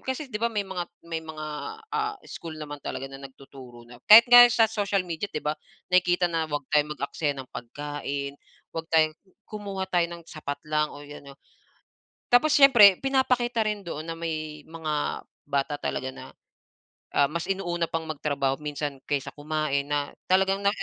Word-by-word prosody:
kasi 260 Hz, 0 st, -5 dB
di 210 Hz, -, -3 dB
ba, 235 Hz, -, +2 dB
may 210 Hz, -3 st, -2 dB
mga 180 Hz, -2 st, -5 dB, 0.2 s
may 165 Hz, -1 st, -4 dB
mga, 160 Hz, -1 st, -8 dB, 0.5 s
ah, 430 Hz, -1 st, -1 dB
school 160 Hz, -2 st, -8 dB
naman 145 Hz, -1 st, -7 dB
talaga 135 Hz, -, -5 dB
na 135 Hz, -, -9 dB
nagtuturo 130 Hz, -3 st, -14 dB
na 120 Hz, 0 st, -15 dB
kahit 220 Hz, +2 st, +11 dB
nga 245 Hz, 0 st, +11 dB
sa 230 Hz, -1 st, +4 dB
social 200 Hz, -3 st, 0 dB
media 175 Hz, +3 st, -4 dB
di 155 Hz, -, -6 dB
ba 150 Hz, -, +1 dB, 0.4 s
nakikita 180 Hz, 0 st, +3 dB
na 165 Hz, -2 st, 0 dB
'wag 145 Hz, -2 st, -3 dB
tayong 150 Hz, 0 st, +2 dB
mag-aksaya 145 Hz, 0 st, -2 dB
ng 130 Hz, -1 st, -8 dB
pagkain, 140 Hz, +2 st, -5 dB, 0.3 s
'wag 165 Hz, 0 st, -5 dB
tayong 155 Hz, -1 st, +3 dB, 0.3 s
kumuha 200 Hz, -2 st, -5 dB
tayo 175 Hz, -2 st, +1 dB
ng 170 Hz, -1 st, -10 dB
sapat 145 Hz, -3 st, -7 dB
lang 150 Hz, 0 st, 0 dB
o 145 Hz, -, -11 dB
ano. 145 Hz, -1 st, -12 dB, 1.0 s
Tapos 290 Hz, +5 st, +5 dB
siyempre 240 Hz, -9 st, +8 dB
pinapakita 255 Hz, -3 st, +1 dB
rin 210 Hz, -2 st, -1 dB
doon 160 Hz, -2 st, -6 dB
na 165 Hz, -, -4 dB
may 155 Hz, -2 st, -5 dB
mga 155 Hz, -2 st, -3 dB, 0.2 s
bata 140 Hz, +1 st, 0 dB
talaga 130 Hz, -2 st, -4 dB
na, -, -, -10 dB, 0.8 s
ah, 140 Hz, -, +5 dB
mas 170 Hz, +1 st, -3 dB
inuuna 175 Hz, -3 st, -1 dB
pang 165 Hz, 0 st, -3 dB
magtrabaho 140 Hz, -3 st, -1 dB
minsan 145 Hz, -2 st, -4 dB
kaysa 140 Hz, -2 st, -2 dB
kumain 150 Hz, -2 st, -1 dB
na 145 Hz, -1 st, -1 dB, 0.2 s
talagang 190 Hz, +1 st, +3 dB
na 200 Hz, -, +5 dB
160 Hz, 170 wpm, -26 LUFS, 145-195 Hz, 1.0 s, kahit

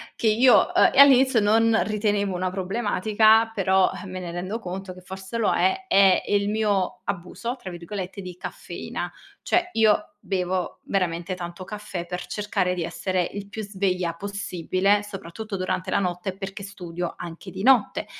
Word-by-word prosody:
che 230 Hz, -, 0 dB
io 240 Hz, +4 st, +6 dB, 0.2 s
uhm, -, -, +6 dB
e -, -, +3 dB
all'inizio 265 Hz, -3 st, +7 dB
non 225 Hz, +2 st, +3 dB
ritenevo 205 Hz, -2 st, 0 dB
una 185 Hz, +1 st, -1 dB
problematica, 215 Hz, +3 st, +3 dB
però, 190 Hz, -1 st, +3 dB
eh, 205 Hz, -, -8 dB
me 185 Hz, 0 st, -6 dB
ne 175 Hz, -2 st, -6 dB
rendo 185 Hz, +6 st, -4 dB
conto 185 Hz, -2 st, -6 dB
che 185 Hz, -, -13 dB
forse 190 Hz, +4 st, -7 dB
lo 225 Hz, -, +2 dB
è, 380 Hz, 0 st, +1 dB
è 195 Hz, -1 st, +5 dB
il 205 Hz, 0 st, +1 dB
mio 210 Hz, -4 st, 0 dB
"abuso", 200 Hz, +7 st, -4 dB
tra 190 Hz, -7 st, -8 dB
virgolette, 185 Hz, +3 st, -6 dB
di 180 Hz, -2 st, -8 dB
caffeina. -, -, -6 dB, 0.3 s
Cioè 355 Hz, 0 st, +1 dB
io 210 Hz, -2 st, +2 dB
bevo 185 Hz, -2 st, -2 dB
veramente 180 Hz, -1 st, -1 dB
tanto 175 Hz, 0 st, -7 dB
caffè 200 Hz, -3 st, -6 dB
per 180 Hz, +1 st, -5 dB
cercare 200 Hz, -3 st, -1 dB
di 175 Hz, -, -2 dB
essere 185 Hz, +1 st, -1 dB
il 200 Hz, 0 st, -6 dB
più 215 Hz, +2 st, -6 dB
sveglia 185 Hz, -4 st, -1 dB
possibile, 200 Hz, +1 st, 0 dB
soprattutto 205 Hz, +1 st, -7 dB
durante 185 Hz, 0 st, -2 dB
la -, -, +2 dB
notte, 180 Hz, 0 st, -3 dB
perché 195 Hz, 0 st, -6 dB
studio 175 Hz, -3 st, -5 dB
anche 170 Hz, +2 st, -8 dB
di 190 Hz, -, -6 dB
notte. 255 Hz, -3 st, +4 dB
195 Hz, 165 wpm, -24 LUFS, 180-210 Hz, 0.3 s, all'inizio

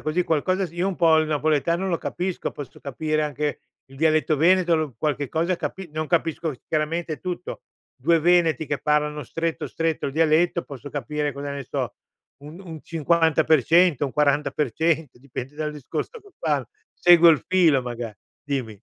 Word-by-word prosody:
così, 155 Hz, +4 st, 0 dB
qualcosa 185 Hz, +4 st, 0 dB
sì 170 Hz, -, -15 dB
io 180 Hz, +2 st, 0 dB
un 195 Hz, -, -1 dB
po’ 165 Hz, -2 st, +4 dB
il 155 Hz, -, +2 dB
napoletano 155 Hz, +4 st, 0 dB
lo 170 Hz, -3 st, 0 dB
capisco, 180 Hz, 0 st, -3 dB
posso 140 Hz, -3 st, -9 dB
capire 155 Hz, +3 st, -2 dB
anche 150 Hz, -1 st, -2 dB, 0.3 s
il 135 Hz, +1 st, -16 dB
dialetto 155 Hz, 0 st, +2 dB
veneto, 175 Hz, +2 st, +4 dB
l 155 Hz, -5 st, -2 dB
qualche 145 Hz, -1 st, -1 dB
cosa 170 Hz, +3 st, 0 dB
capi 190 Hz, -2 st, -6 dB
non 155 Hz, 0 st, -3 dB
capisco, 165 Hz, -2 st, 0 dB, 0.2 s
chiaramente 155 Hz, +1 st, -1 dB
tutto, 180 Hz, -1 st, -6 dB, 0.3 s
2 165 Hz, +5 st, +2 dB
veneti 170 Hz, -2 st, +3 dB
che 145 Hz, 0 st, -2 dB
parlano 150 Hz, -1 st, 0 dB
stretto, 165 Hz, +3 st, -3 dB
stretto 165 Hz, -3 st, -2 dB
il 135 Hz, -, -4 dB
dialetto, 165 Hz, +2 st, +2 dB
posso 140 Hz, 0 st, -9 dB
capire, 150 Hz, 0 st, -2 dB
cosa 140 Hz, +1 st, -6 dB
ne 140 Hz, -1 st, -5 dB
so, -, -, -3 dB, 0.5 s
un 155 Hz, +6 st, -10 dB
un 165 Hz, -5 st, -9 dB
50% 160 Hz, -1 st, +3 dB
un 135 Hz, -, -2 dB
40% 150 Hz, 0 st, 0 dB
dipende 135 Hz, +1 st, -7 dB
dal 155 Hz, -1 st, -2 dB
discorso 150 Hz, -, -5 dB
che 405 Hz, -, -18 dB
fan, 145 Hz, -5 st, 0 dB, 0.3 s
seguo 175 Hz, -1 st, +6 dB
il 155 Hz, -, +2 dB
filo 170 Hz, -7 st, +4 dB
maga 120 Hz, -2 st, -5 dB, 0.3 s
dimmi. 130 Hz, -8 st, -4 dB
155 Hz, 165 wpm, -24 LUFS, 145-170 Hz, 0.5 s, seguo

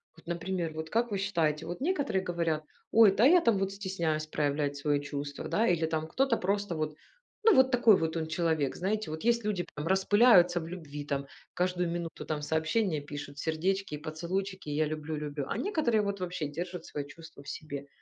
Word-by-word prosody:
Вот, 165 Hz, -, -19 dB
например, 170 Hz, -1 st, -2 dB
вот 160 Hz, 0 st, -5 dB
как 230 Hz, +3 st, +1 dB
вы 200 Hz, -, 0 dB
считаете, 165 Hz, -6 st, 0 dB
вот 175 Hz, +9 st, -6 dB
некоторые 285 Hz, -, 0 dB
говорят: 165 Hz, -3 st, -1 dB, 0.3 s
"Ой, 220 Hz, -3 st, +7 dB
да, 215 Hz, -, +3 dB
а -, -, +9 dB
я 350 Hz, +4 st, +6 dB
там 230 Hz, -7 st, +3 dB
вот 195 Hz, 0 st, -1 dB
стесняюсь 175 Hz, -6 st, -2 dB
проявлять 145 Hz, -1 st, 0 dB
свои 145 Hz, 0 st, +1 dB
чувства", 145 Hz, 0 st, -5 dB
да. 225 Hz, +2 st, +2 dB
Или 170 Hz, -4 st, +2 dB
там 160 Hz, 0 st, -2 dB
кто-то 260 Hz, +8 st, +2 dB
просто 200 Hz, -1 st, -1 dB
вот, 155 Hz, -1 st, -2 dB, 0.5 s
ну, 445 Hz, -, +7 dB
вот 260 Hz, 0 st, +5 dB
такой 240 Hz, -4 st, +6 dB
вот 160 Hz, 0 st, -1 dB
он 160 Hz, -1 st, -2 dB
человек. 160 Hz, -4 st, 0 dB
Знаете, 195 Hz, -1 st, -2 dB
вот 160 Hz, 0 st, -5 dB
есть 235 Hz, 0 st, +2 dB
люди 200 Hz, -4 st, -1 dB
там 150 Hz, +2 st, -4 dB
распыляются 190 Hz, -2 st, +5 dB
в 160 Hz, -, -6 dB
любви, 150 Hz, -5 st, -7 dB
там, 140 Hz, -1 st, -2 dB, 0.3 s
каждую 180 Hz, -1 st, 0 dB
минуту 170 Hz, -1 st, -4 dB
там 155 Hz, -1 st, -2 dB
сообщения 160 Hz, +3 st, 0 dB
пишут, 145 Hz, 0 st, -8 dB
сердечки 180 Hz, +3 st, -1 dB
и -, -, -5 dB
поцелуйчики, 175 Hz, +4 st, -4 dB
я 150 Hz, +2 st, +1 dB
люблю, 155 Hz, +1 st, -4 dB
люблю, 145 Hz, -2 st, -4 dB
а -, -, -2 dB
некоторые 300 Hz, -, +1 dB
вот 200 Hz, -1 st, -2 dB
вообще 175 Hz, -4 st, -3 dB
держат 175 Hz, +4 st, -5 dB
свои 145 Hz, -1 st, -5 dB
чувства 160 Hz, 0 st, -13 dB
в 145 Hz, -, -9 dB
себе. 145 Hz, -2 st, -6 dB
170 Hz, 200 wpm, -30 LUFS, 155-195 Hz, 0.5 s, а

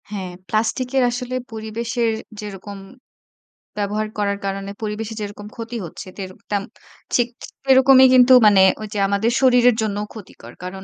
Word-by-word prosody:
হ্যাঁ, 190 Hz, -3 st, -5 dB, 0.2 s
প্লাস্টিকের 250 Hz, +4 st, 0 dB
আসলে 250 Hz, +1 st, -4 dB, 0.2 s
পরিবেশের 225 Hz, +1 st, -2 dB, 0.3 s
যেরকম 205 Hz, -1 st, -8 dB, 1.0 s
ব্যবহার 210 Hz, +1 st, -1 dB
করার 200 Hz, -1 st, 0 dB
কারণে 195 Hz, 0 st, -4 dB
পরিবেশে 215 Hz, +1 st, -4 dB
যেরকম 205 Hz, 0 st, -7 dB
ক্ষতি 230 Hz, 0 st, -6 dB
হচ্ছে, 170 Hz, -, -9 dB
তেরক 190 Hz, -2 st, -8 dB
তেম 200 Hz, -1 st, 0 dB, 0.5 s
ঠিক 245 Hz, -1 st, +3 dB, 0.4 s
সেরকমই 265 Hz, 0 st, +7 dB
কিন্তু 255 Hz, 0 st, +7 dB
মানে 205 Hz, -2 st, +6 dB, 0.2 s
ঐযে 210 Hz, -1 st, -5 dB
আমাদের 200 Hz, +4 st, +1 dB
শরীরের 245 Hz, -2 st, +5 dB
জন্যও 210 Hz, -1 st, -2 dB
ক্ষতিকর। 215 Hz, -4 st, -12 dB
কারণ 190 Hz, +1 st, -7 dB
215 Hz, 135 wpm, -21 LUFS, 200-240 Hz, 1.0 s, সেরকমই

